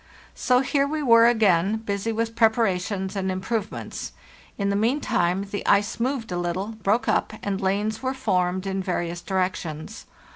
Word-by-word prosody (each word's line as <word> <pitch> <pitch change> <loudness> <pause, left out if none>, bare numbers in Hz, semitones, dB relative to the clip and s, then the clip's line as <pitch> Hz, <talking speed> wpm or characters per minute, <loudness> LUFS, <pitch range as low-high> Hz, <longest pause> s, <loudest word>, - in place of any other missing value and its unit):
So 250 0 +2
here 275 +1 +1
we 305 +1 -2
were 230 -2 +7
again, 205 -4 +3
busy 215 0 -3
with 225 0 -2
preparations 205 -4 +1
and 190 -1 -1
improvements. 210 +3 -4 0.4
In 200 -1 0
the - - 0
meantime 200 -5 +1
the 205 - -3
ice 205 +3 +2
moved 245 -3 -2
a 175 - -1
little, 175 +4 -2
broke 215 +4 +1
up, - - +1
and 200 0 -2
lanes 205 +3 -1
were 260 0 -2
formed 185 -6 0
in 195 0 -2
various 175 -2 -3
directions. 185 -1 -3
200 Hz, 155 wpm, -24 LUFS, 185-230 Hz, 0.4 s, were